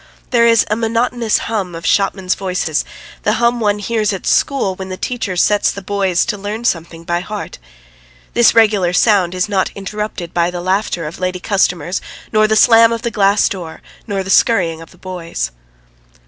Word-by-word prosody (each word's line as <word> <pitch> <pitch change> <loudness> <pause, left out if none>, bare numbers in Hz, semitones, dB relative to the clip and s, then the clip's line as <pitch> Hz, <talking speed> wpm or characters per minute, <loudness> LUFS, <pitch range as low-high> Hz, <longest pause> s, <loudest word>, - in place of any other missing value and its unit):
There 235 -2 +4
is 230 -1 +4
a 215 - 0
monotonous 230 0 0
hum 195 -6 -3
of 165 0 -8
shopmen's 190 0 +1
voices, 180 -5 -2 0.4
the 210 - +1
hum 235 +2 +1
one 210 -2 +1
hears 215 0 -1
at 195 - -5
school 270 -9 +1
when 190 0 -8
the 185 - -5
teacher 225 -6 -3
sets 205 +3 +3
the 200 - -6
boys 190 -2 0
to 210 -4 -3
learn 210 +4 -5
something 165 -4 -2
by 170 +1 -1
heart. 205 - -7 0.7
This 240 -1 +4
regular 205 -6 +3
sound 185 -3 +3
is 185 +2 0
not 195 -2 0
interrupted 200 -3 -5
by 170 0 +1
the 175 0 -5
laughter 185 -2 -1
of 150 - -7
lady 185 0 -2
customers 180 -3 0 0.3
nor 215 0 +4
the 215 - +1
slam 230 +1 +6
of 230 -1 -3
the 235 - -1
glass 200 -1 +3
door, 175 -5 -7 0.2
nor 195 -3 -2
the 190 - -4
scurrying 175 -10 +2
of 165 - -12
the 180 - -19
boys. 170 - -5
195 Hz, 185 wpm, -16 LUFS, 180-220 Hz, 0.7 s, slam